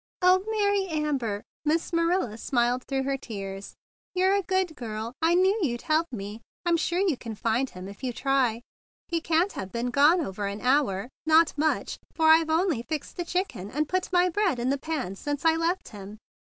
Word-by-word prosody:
"O 370 +1 +5
Mary 405 -2 +1
Amber 280 - -1 0.2
I" 305 +2 +3
smiled 335 - 0
Miss 220 - -8
Ma¬ 240 -3 +3
nila 245 +1 0
through 270 -1 -1
her 275 0 -1
tears. 195 -6 -7 0.4
"You're 375 +1 +3
a 400 - +2
good 375 -3 -1
girl. 225 -2 -5
I 330 +2 +4
knew 380 +3 +4
you'd 240 -8 -1
help 320 +1 +2
me. 210 -1 -6 0.2
I'm 345 -1 +3
sure 340 +2 0
you 380 -6 +2
can 230 -3 -7
find 230 +5 0
him 185 +1 -9
if 200 +5 -11
you 255 - -1
try. 250 -2 +1 0.5
He 335 -1 0
can't 335 +4 +2
have 190 0 -6
been 240 +1 -2
gone 295 +7 +5
over 200 - -3
an 200 +1 -5
hour, 250 -5 +1 0.2
not 320 0 +5
much; 310 +1 -1 0.2
for 320 -1 +4
I've 320 0 +5
only 320 -5 +1
fixed 300 +4 -5
the 350 - -2
chicken 345 - -3
and 300 +6 -1
put 370 +2 -1
my 360 0 +4
bread 365 -5 +1
in 245 +2 0
the 280 - -1
pans 265 - -4
since 290 +2 -3
I 325 0 +5
left 335 +3 -1
him." 205 0 -10
295 Hz, 205 wpm, -27 LUFS, 235-340 Hz, 0.5 s, O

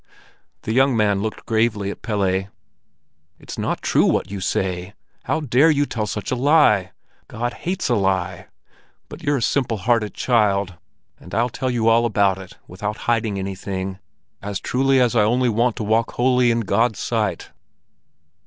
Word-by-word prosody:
The 110 - -2
young 130 0 +3
man 100 -2 +2
looked 110 +1 -5
gravely 110 -3 0
at - - -10
Pelle. 95 -3 0 0.9
"It's - - -9
not - - -2
true - - +3
what - - 0
you 100 - -4
say! 95 +1 -2 0.3
How 160 - 0
dare 140 +3 +4
you 145 -2 +2
tell 110 -6 -3
such 105 - -4
a - - +1
lie? 125 - +3 0.4
God 120 +2 -3
hates 180 +2 -3
a - - +1
lie. 95 -3 -1 0.6
But - - -10
you're 145 0 +1
a 120 - -2
simple 125 -5 0
hearted 110 0 0
child, 100 -6 +1 0.5
and 90 - -9
I'll 120 +3 +1
tell 130 +2 -3
you 120 -2 0
all 115 +1 +4
about 100 -3 +2
it 95 -1 -12
without 105 +4 -5
hiding 110 -3 0
anything, 95 0 -4 0.4
as 100 -1 -4
truly 135 +1 +2
as 125 -1 +2
I 115 - +5
only 120 +4 +2
want 115 +1 +1
to - - -4
walk 110 +2 +1
wholly 125 0 +3
in 115 0 +1
God's 110 +1 +1
sight." - - -2
110 Hz, 170 wpm, -21 LUFS, 100-120 Hz, 0.9 s, I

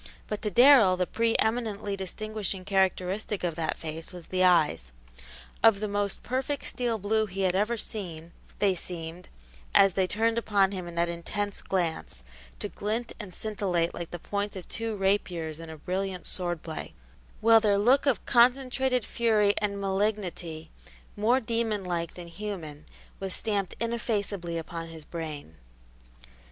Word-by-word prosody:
But 210 - -4
to 210 - 0
Darrell 240 -4 +7
the 180 - +1
pre 230 +4 +1
eminently 220 -3 0
distinguishing 195 0 -3
characteristic 190 +1 0
of 175 -2 0
that 160 0 -2
face 160 0 -6
was 175 -2 -10
the 185 0 +1
eyes. 150 - +3 0.7
Of 225 -3 +6
the 215 - -1
most 205 -1 -2
perfect 265 +3 -2
steel 240 -2 -1
blue 215 +2 +1
he 195 0 -4
had 185 -2 +3
ever 210 +5 +1
seen, 170 -7 -5 0.3
they 200 -2 +3
seemed, 170 0 -7 0.5
as 195 -2 +7
they 190 -1 +2
turned 225 +3 +1
upon 200 -4 +2
him 185 -3 -5
in 170 - -8
that 170 0 +2
intense 195 +4 -3
glance, 165 - -2 0.4
to - - -3
glint 225 +3 -3
and 205 -4 -7
scintillate 185 -4 -1
like 170 -1 -5
the 175 - -5
points 205 +4 -3
of 185 - -7
two 225 -1 -2
rapiers 180 -5 0
in 165 -1 -8
a 160 - -8
brilliant 185 +3 -3
sword 175 -3 -2
play, 160 - -6 0.4
while 225 0 +7
their 210 -2 +3
look 255 +8 +4
of 265 - +1
concentrated 255 0 +3
fury 215 -3 +3
and 200 -1 -1
malignity, 190 -5 -2 0.4
more 230 +5 +3
demon 230 -4 -1
like 170 -2 -2
than 175 -1 -8
human, 170 -6 -6 0.3
was 195 -1 -1
stamped 200 -4 -1
ineffaceably 205 -7 -2
upon 165 0 -5
his 160 -2 -10
brain. 150 - -6
195 Hz, 155 wpm, -28 LUFS, 175-215 Hz, 0.7 s, Darrell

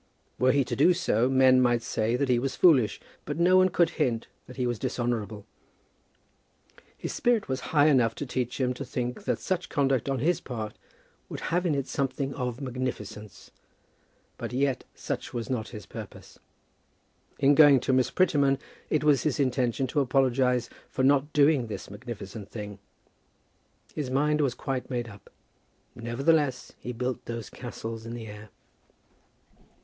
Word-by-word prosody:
Were 130 0 +4
he 140 0 +3
to - - -4
do 175 +6 +5
so, 125 -8 +1
men 130 -1 +5
might 120 -2 +2
say 115 +1 0
that 140 +2 0
he 125 -2 +3
was 130 +1 -2
foolish, 135 - +4 0.2
but - - -4
no 175 +2 +4
one 185 0 +6
could 170 -1 +2
hint 120 -5 +1 0.2
that 125 - -12
he 125 - 0
was 120 -3 -1
dishonourable. 115 -4 -2 1.5
His - - -5
spirit 240 -3 +1
was 130 0 -2
high 145 -2 +4
enough 125 -7 +4
to 145 - -4
teach 125 -1 -3
him 125 -1 +1
to 130 - -6
think 125 +7 -4
that - - +1
such 185 -1 -2
conduct 135 -4 +1
on 135 - 0
his 160 +7 +1
part 110 -4 -5 0.5
would - - -6
have 180 +1 +2
in 155 - +1
it 140 -2 -1
something 135 0 -2
of 125 -2 -3
magnificence; 120 -6 -6 0.9
but, - - -4
yet, 135 -1 0
such - - -5
was 120 +2 -3
not 120 -3 -2
his 105 -5 -9
purpose. - - -10 1.0
In 140 0 +5
going 145 -3 +7
to 130 - 0
Miss 130 -1 +3
Prettyman 140 -7 +3 0.3
it 150 - +1
was 150 -3 +4
his 150 -3 -1
intention 130 -1 +1
to 130 +4 -1
apologize 130 -2 +2 0.2
for 130 - -2
not 140 +2 +3
doing 145 -4 +3
this 105 - -7
magnificent 105 -2 -8
thing. 105 -3 -7 1.1
His 145 -4 -3
mind 150 +3 +2
was 130 -4 +1
quite 130 -2 -4
made 120 -3 -3
up. 100 -3 -14 0.6
Nevertheless 135 +4 0
he 125 - -5
built 125 +1 -3
those 115 -2 -6
castles 115 -2 -7
in 115 - -5
the 115 -2 -7
air. 105 0 -10
130 Hz, 165 wpm, -27 LUFS, 120-140 Hz, 1.5 s, going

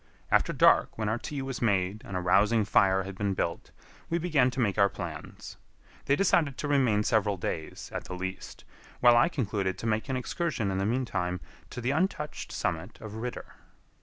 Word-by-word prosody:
After - - +3
dark, - - +4
when 110 -1 -1
our 110 +2 -1
tea 140 +1 -5
was 135 -1 -5
made 100 -2 +1
and 95 - -5
a - - -2
rousing 105 +5 +3
fire 95 -1 +3
had 95 0 -7
been 100 0 -1
built, 85 -2 -3 0.4
we 170 - +1
began 155 -7 +2
to 130 +1 -6
make 105 -4 +1
our 100 0 +5
plans. - - -8 0.5
They 140 - +3
decided 155 -6 +2
to 145 - -3
remain 130 -8 +3
several 105 -2 +1
days, 80 -2 -5
at - - -4
the 90 - -6
least, 95 +1 -6 0.3
while 120 -1 +6
I 120 +8 +5
concluded 100 - -2
to 115 - -7
make 110 +4 -1
an 130 - 0
excursion 130 - -2
in 95 - -1
the 95 - 0
mean 125 +3 0
time 90 -4 -2 0.3
to 125 - -6
the 120 +3 0
untouched 150 -1 -2
summit - - -3
of 110 -2 -8
Ritter. 120 +2 -6
110 Hz, 195 wpm, -28 LUFS, 95-130 Hz, 0.5 s, while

